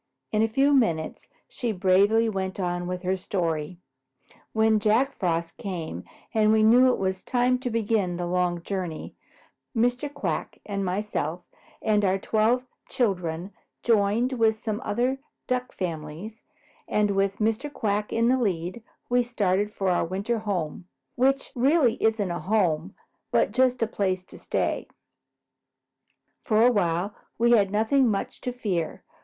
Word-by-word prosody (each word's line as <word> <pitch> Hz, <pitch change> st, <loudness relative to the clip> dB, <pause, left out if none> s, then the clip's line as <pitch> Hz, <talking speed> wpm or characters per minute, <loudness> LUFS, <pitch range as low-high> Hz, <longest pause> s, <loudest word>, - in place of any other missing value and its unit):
In 215 Hz, -, +2 dB
a 225 Hz, -, +4 dB
few 270 Hz, +6 st, +3 dB
minutes 170 Hz, -, +1 dB, 0.2 s
she 240 Hz, -3 st, -3 dB
bravely 200 Hz, +4 st, +3 dB
went 190 Hz, -2 st, -3 dB
on 175 Hz, -1 st, -2 dB
with 180 Hz, 0 st, -4 dB
her 185 Hz, +1 st, +1 dB
story. 170 Hz, -3 st, -2 dB, 0.7 s
"When 220 Hz, -1 st, +3 dB
Jack 225 Hz, +6 st, +2 dB
Frost 170 Hz, -3 st, -2 dB
came 165 Hz, -, -5 dB, 0.3 s
and 215 Hz, -1 st, +4 dB
we 220 Hz, 0 st, +4 dB
knew 250 Hz, +4 st, +6 dB
it -, -, 0 dB
was 190 Hz, -1 st, -2 dB
time 250 Hz, 0 st, +1 dB
to 255 Hz, -1 st, -3 dB
begin 220 Hz, -5 st, 0 dB
the 175 Hz, 0 st, -3 dB
long 175 Hz, -1 st, 0 dB
journey, 180 Hz, -5 st, -4 dB, 0.6 s
Mr. 245 Hz, +5 st, +1 dB
Quack 290 Hz, -, -3 dB
and 200 Hz, -1 st, -2 dB
myself 180 Hz, -3 st, -2 dB, 0.4 s
and 210 Hz, -1 st, +2 dB
our 190 Hz, -1 st, +2 dB
twelve 220 Hz, +5 st, +1 dB, 0.2 s
children 180 Hz, -5 st, -1 dB, 0.3 s
joined 225 Hz, +3 st, +2 dB
with 225 Hz, -3 st, +2 dB
some 215 Hz, +1 st, -3 dB
other 250 Hz, +5 st, 0 dB, 0.3 s
Duck 250 Hz, 0 st, -1 dB
families, 170 Hz, +5 st, -6 dB, 0.5 s
and 210 Hz, -1 st, +2 dB
with 195 Hz, 0 st, +1 dB
Mr. 225 Hz, +7 st, -1 dB
Quack 210 Hz, -5 st, -1 dB
in 230 Hz, 0 st, +2 dB
the 260 Hz, +1 st, +3 dB
lead, 185 Hz, -1 st, -2 dB, 0.3 s
we 245 Hz, 0 st, +3 dB
started 205 Hz, -4 st, 0 dB
for 195 Hz, -2 st, -1 dB
our 175 Hz, -, +2 dB
winter 200 Hz, +7 st, -2 dB
home, 180 Hz, -5 st, -3 dB, 0.3 s
which 270 Hz, +2 st, +1 dB
really 265 Hz, -1 st, +3 dB
isn't 220 Hz, -4 st, +1 dB
a 175 Hz, -, -3 dB
home 185 Hz, -4 st, 0 dB, 0.3 s
but -, -, +2 dB
just 250 Hz, +1 st, +2 dB
a -, -, +1 dB
place 190 Hz, -4 st, -1 dB
to -, -, -14 dB
stay. -, -, -1 dB, 1.6 s
For 220 Hz, +1 st, +4 dB
a 250 Hz, -, +6 dB
while 185 Hz, -1 st, 0 dB, 0.2 s
we 235 Hz, +1 st, +3 dB
had 205 Hz, -5 st, +5 dB
nothing 225 Hz, +5 st, +3 dB
much 195 Hz, -2 st, -3 dB
to 250 Hz, -, -2 dB
fear. 195 Hz, -9 st, -3 dB
210 Hz, 150 wpm, -26 LUFS, 185-235 Hz, 1.6 s, knew